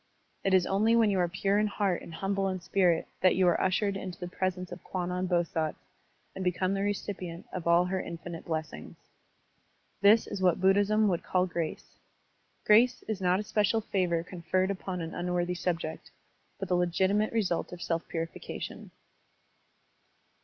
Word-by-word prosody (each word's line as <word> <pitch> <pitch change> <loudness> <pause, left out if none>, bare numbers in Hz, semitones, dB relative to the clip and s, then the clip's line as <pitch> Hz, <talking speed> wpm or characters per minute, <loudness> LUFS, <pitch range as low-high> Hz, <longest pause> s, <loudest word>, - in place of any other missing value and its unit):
It 195 -1 +3
is 180 -2 +4
only 215 +4 +3
when 225 -3 +4
you 190 - +1
are 175 - +3
pure 195 +3 +1
in 215 - +2
heart 200 -3 0
and - - -10
himible 195 +3 -1
in 185 - -4
spirit 175 -1 +2
that 185 - +5
you 185 -1 +3
are 175 - +3
ushered 195 +2 +1
into 185 -2 -6
the 180 - -5
presence 180 0 -3
of - - -9
Kwannon 180 0 -2
Bosatz 170 -3 0 0.6
and 190 - -5
become 185 +1 0
the 195 - -1
recipient 195 -4 -4
of 175 -2 -4
all 170 +1 +5
her 185 +1 -1
infinite 170 0 -7
blessings. 160 -1 -5 1.1
This 210 +3 +6
is 195 - -5
what 180 -3 +3
Buddhism 205 +3 +4
would 175 -4 0
call 185 0 +1
grace. 170 -3 -5 0.7
Grace 240 +4 +5
is 215 -3 -3
not 180 +1 +3
a - - -2
special 210 +1 +1
favor 180 -5 0
conferred 185 +2 -1
upon 185 -2 -4
an 165 0 -5
unworthy 180 0 -1
subject, 165 -2 -3 0.5
but 195 - -4
the 180 - +1
legitimate 190 +4 +2
result 200 -7 0
of 180 - -8
self 165 -1 -2
purification. 165 -1 -6
185 Hz, 165 wpm, -29 LUFS, 175-195 Hz, 1.1 s, This